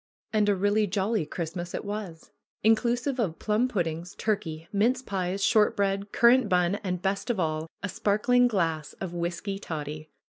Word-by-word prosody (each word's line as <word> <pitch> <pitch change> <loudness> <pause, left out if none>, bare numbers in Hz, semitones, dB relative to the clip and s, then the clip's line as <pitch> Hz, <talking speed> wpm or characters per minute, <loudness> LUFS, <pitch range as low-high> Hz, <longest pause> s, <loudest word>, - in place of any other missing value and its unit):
And 210 -1 +3
a 205 - +3
really 205 +2 +2
jolly 195 -2 0
Christmas 175 +2 -4
it - - -5
was! 200 -5 -6 0.3
Inclusive 240 +4 +2
of 180 -8 0
plum 215 +4 +1
puddings, 175 -6 -3
turkey, 165 -7 -2
mince 240 +6 +2
pies, 195 -2 -2
short 215 -2 +4
bread, 200 0 0
currant 240 -1 +5
bun, 180 +2 +2
and, 180 -2 -3
best 195 +4 -1
of 230 -5 0
all, 155 -1 -1 0.2
a - - 0
sparkling 245 +6 +3
glass 165 -9 -1
of 185 -3 -6
whisky 175 +3 -3
toddy 155 -3 -6
195 Hz, 165 wpm, -27 LUFS, 170-215 Hz, 0.3 s, currant